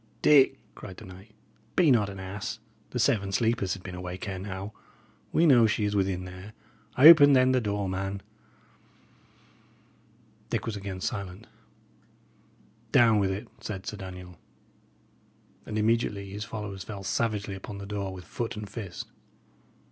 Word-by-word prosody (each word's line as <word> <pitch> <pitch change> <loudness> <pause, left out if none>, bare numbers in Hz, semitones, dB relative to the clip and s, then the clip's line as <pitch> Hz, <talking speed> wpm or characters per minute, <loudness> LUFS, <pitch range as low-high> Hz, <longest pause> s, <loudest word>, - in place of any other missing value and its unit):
"Dick," 135 -2 +6 0.2
cried 95 -3 -10
the - - -10
knight, 95 +3 -13 0.4
"be 170 -6 +5
not 105 -5 +3
an 100 -1 -8
ass. 95 +4 -5 0.3
The - - -5
Seven 110 -6 +1
Sleepers 105 -2 +1
had 95 - -12
been 95 - -7
awake 90 +1 -6
ere 95 -1 -4
now. 95 +1 -6 0.6
We 165 - +3
know 120 -7 +6
she 105 0 0
is 105 0 -1
within 95 -2 0
there. 95 +3 -10 0.4
Open, 145 0 +9
then, 130 -1 +5
the 130 -1 +2
door, 105 -2 -2
man." 95 +1 -3 2.3
Dick - - -2
was 110 - -3
again 95 -2 -6
silent. 100 -1 -4 1.5
"Down 115 -3 +5
with 100 -1 +1
it," 100 +5 -4
said 95 -3 -6
Sir 105 - -5
Daniel. 90 -2 -9 1.3
And 110 - -3
immediately 105 -3 0
his 105 +1 -5
followers 105 -4 -6
fell 100 -3 -7
savagely 105 -1 -1
upon 95 +1 -8
the 100 - -7
door 100 -1 -4
with 90 -1 -9
foot 115 -1 -4
and 105 -1 -6
fist. 100 -4 -7
100 Hz, 150 wpm, -28 LUFS, 95-115 Hz, 2.3 s, Open